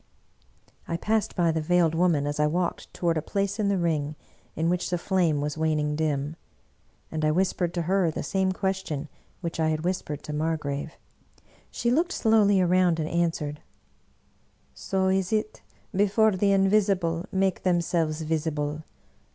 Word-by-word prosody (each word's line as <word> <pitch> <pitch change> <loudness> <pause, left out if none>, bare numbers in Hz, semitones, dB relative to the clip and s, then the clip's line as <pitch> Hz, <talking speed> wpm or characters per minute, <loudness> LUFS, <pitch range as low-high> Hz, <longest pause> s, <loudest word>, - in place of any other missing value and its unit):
" - - -34
I 170 - -2
passed 215 +4 0
by 170 -3 +2
the 160 0 -1
Veiled 170 0 +2
Woman 165 -4 +2
as 145 +1 -3
I 150 - +4
walked 175 +3 -2
toward 165 -2 0
a - - -4
place 200 +4 -2
in 210 - +1
the 200 -1 +2
ring 155 -4 -1 0.4
in 160 +1 0
which 180 +1 0
the 180 - 0
flame 170 -5 +1
was 150 +1 -3
waning 150 -2 +1
dim; 150 0 -1 0.7
and 155 -1 -3
I 155 - +3
whispered 180 +1 +1
to 170 - 0
her 185 0 +2
the 155 - -4
same 190 -1 0
question 185 -6 -3 0.3
which 170 -2 -4
I 160 -1 +2
had 155 0 -1
whis 180 +2 -1
pered 150 -1 -7
to 150 - -6
Margrave. 150 -1 -2 0.8
She 235 - -1
looked 335 +7 +1
slowly 210 -3 +4
around 180 -2 +3
and 155 - -1
an 170 +1 +2
swered, 150 -2 -5 0.7
" - - -39 0.2
So 190 -1 -1
is 190 -1 +1
it 215 0 -1 0.3
before 210 +2 +4
the 200 +1 +2
Invisible 195 -3 +2
make 190 0 +1
themselves 170 -3 0
visible! 155 -1 -2
170 Hz, 170 wpm, -26 LUFS, 155-190 Hz, 0.8 s, I